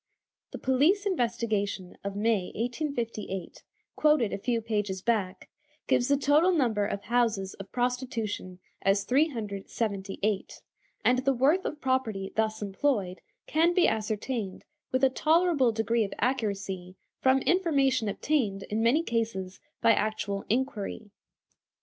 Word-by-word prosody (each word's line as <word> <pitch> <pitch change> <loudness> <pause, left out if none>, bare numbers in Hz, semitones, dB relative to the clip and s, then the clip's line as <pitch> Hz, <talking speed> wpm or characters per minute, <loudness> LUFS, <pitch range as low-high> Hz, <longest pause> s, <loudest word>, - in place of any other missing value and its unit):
The - - -7
police 300 +11 +2
investigation 230 - -1
of 200 0 -4
May, 210 -2 +1
1858, 230 - -3 0.3
quoted 300 -8 +3
a - - -3
few 235 +3 0
pages 210 -4 -2
back, 200 -4 -1 0.4
gives 245 - +2
the 280 0 +3
total 295 +6 +4
number 230 - +1
of 200 0 -4
houses 225 -5 +1
of 195 - -11
prostitution 245 -7 -2 0.2
as 195 +1 +2
378, 210 -6 -1 0.4
and 250 0 +4
the 270 +1 +2
worth 285 +9 +2
of 300 - -3
property 230 -7 -1
thus 220 -1 0
employed 200 -2 -1 0.2
can 335 +3 +2
be 365 - +5
ascertained 215 -1 -2 0.3
with 260 +1 0
a 265 - +7
tolerable 315 -4 +3
degree 225 +1 +1
of 200 - -5
accuracy 200 -7 -2 0.2
from 265 0 +3
information 275 - +2
obtained, 205 -5 0
in 215 +1 0
many 250 +8 +3
cases, 220 - -2 0.2
by 230 - +6
actual 205 -2 -1
inquiry. 220 -4 -2
230 Hz, 125 wpm, -28 LUFS, 200-265 Hz, 0.4 s, a